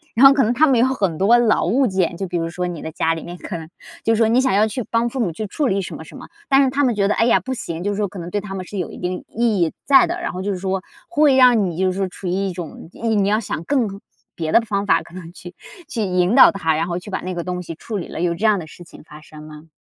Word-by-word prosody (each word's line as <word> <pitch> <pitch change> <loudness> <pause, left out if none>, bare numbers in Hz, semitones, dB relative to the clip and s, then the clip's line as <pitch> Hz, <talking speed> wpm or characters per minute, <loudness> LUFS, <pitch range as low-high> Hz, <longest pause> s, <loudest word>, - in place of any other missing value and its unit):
然 255 - +6
后 270 - +9
可 275 -1 +3
能 230 +3 +1
他 310 +5 +4
们 255 -4 +3
有 245 - +5
很 195 -11 -1
多 220 +6 +5
老 235 -3 +2
物 250 +8 +2
件， 190 -3 0
就 195 - -4
比 175 - -3
如 165 0 -2
说 180 +1 -3
你 170 -3 -6
的 160 - -6
家 165 +1 0
里 165 - -6
面 175 +1 -8
可 175 - -6
能 160 -1 -9 0.4
就 225 - +2
说 225 0 +3
你 235 +3 +3
想 260 -7 +2
要 210 +2 +3
去 250 +3 -4
帮 230 +1 +1
父 265 - -5
母 200 -8 0
去 215 +7 -5
处 285 +7 -1
理 195 -2 0
什 - - -6
么 - - -9
什 - - -13
么， - - -11 0.2
但 275 -1 +5
是 265 - +2
他 280 +2 0
们 245 -4 +2
觉 200 -1 +1
得： 210 - +2
“哎 230 - +3
呀， 240 - +4
不 260 - -4
行。” 170 -8 -5
就 205 - -1
是 200 - -3
说 210 - 0
可 200 0 -11
能 170 - -7
对 205 - -1
他 195 -2 -7
们 185 - -5
是 205 - -8
有 180 - -4
一 - - -10
定 180 0 -4
意 225 -3 0
义 165 - +2
在 270 -3 +6
的， 350 +1 -3
然 - - -3
后 185 - -5
就 200 - -2
是 190 - -3
说 190 0 -2 0.3
会 300 -5 +4
让 245 -5 +5
你 170 -3 -4
就 185 0 +1
是 185 - -6
说 195 - 0
处 185 +1 -8
于 175 - -1
一 195 +1 -1
种， 170 -2 -8
你 220 -4 0
要 210 +2 +2
想 175 -6 -5
更 260 -6 +1 0.5
别 160 -2 -3
的 - - +6
方 205 -2 -2
法 - - +3
可 - - -17
能 175 -2 -9
去 175 0 -11 0.3
去 235 - -3
引 180 +1 +1
导 270 - +8
他， 160 -5 0
然 165 +2 -1
后 175 0 -3
去 185 - -11
把 - - -2
那 185 +1 -4
个 170 - -3
东 180 0 -4
西 165 -1 -8
处 210 +6 -6
理 175 - -5
了， - - -7
有 175 -1 +1
这 195 +6 -3
样 215 -2 +4
的 165 - -7
事 175 - -13
情 170 - -15
发 150 -1 -14
生 155 0 -13
吗？ 155 +1 -12
195 Hz, 350 characters per minute, -20 LUFS, 175-230 Hz, 0.5 s, 后